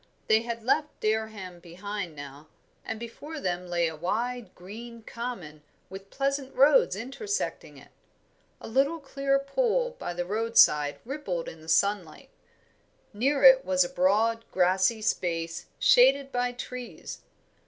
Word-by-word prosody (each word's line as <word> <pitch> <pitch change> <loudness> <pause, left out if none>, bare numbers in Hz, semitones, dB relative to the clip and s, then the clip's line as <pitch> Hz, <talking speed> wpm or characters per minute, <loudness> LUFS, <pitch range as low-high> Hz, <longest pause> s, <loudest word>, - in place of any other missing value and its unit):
They 220 0 +4
had 230 -1 -5
left 300 +5 0
Dereham 215 -5 -2
behind 180 0 -6
now, 145 +1 -10 0.4
and 220 - -5
before 290 +7 -8
them 180 -6 -3
lay 170 -1 +1
a 160 - -5
wide, 220 +6 -3
green 225 +5 -10
common, 215 -12 -7 0.3
with 195 +1 -10
pleasant 275 +1 -2
roads 275 -7 +5
intersecting 270 - -4
it. - - -16 0.7
A - - -9
little 275 +8 +1
clear 275 -1 0
pool 485 - 0
by 175 - -5
the 175 0 -2
roadside 200 -8 +3
rippled 240 - -4
in 160 - -9
the 160 - -11
sunlight. 200 - 0 0.8
Near 275 +7 0
it 265 0 +8
was 185 -4 +2
a 175 - -4
broad, 220 +5 +2
grassy 190 +4 +2
space 165 -4 -2
shaded 270 +2 +5
by 245 -1 -1
trees. 250 0 -8
220 Hz, 135 wpm, -27 LUFS, 180-265 Hz, 0.8 s, it